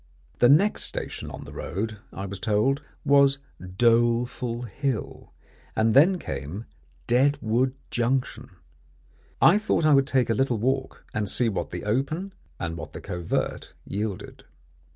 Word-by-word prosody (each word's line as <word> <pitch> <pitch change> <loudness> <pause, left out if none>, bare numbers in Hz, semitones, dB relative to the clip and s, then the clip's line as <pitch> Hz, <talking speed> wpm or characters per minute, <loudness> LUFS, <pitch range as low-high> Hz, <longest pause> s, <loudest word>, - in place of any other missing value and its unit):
The 120 - +6
next 185 +9 +4
station - - -5
on - - -8
the - - -11
road, 105 +3 -4
I 95 - -6
was 100 0 -6
told, 110 +8 +1 0.2
was 140 -1 +5 0.4
Doleful 120 +1 +2
Hill, 125 +2 -4 0.4
and 110 0 +3
then 170 +8 +6
came 75 - -6 0.4
Deadwood 130 -1 +2 0.2
Junction. 125 +2 -1 0.9
I 195 +5 +6
thought 215 -6 +1
I 155 - +6
would 135 -1 +4
take 130 -4 +2
a - - +3
little 125 +1 +1
walk, 130 +4 -2
and 105 -2 -1
see 120 -2 +2
what 100 - -3
the - - -6
open 145 - -1 0.3
and 85 -1 -3
what 80 -2 -8
the - - -6
covert 90 -4 -3
yielded. 100 -1 -5
120 Hz, 140 wpm, -26 LUFS, 105-135 Hz, 0.9 s, The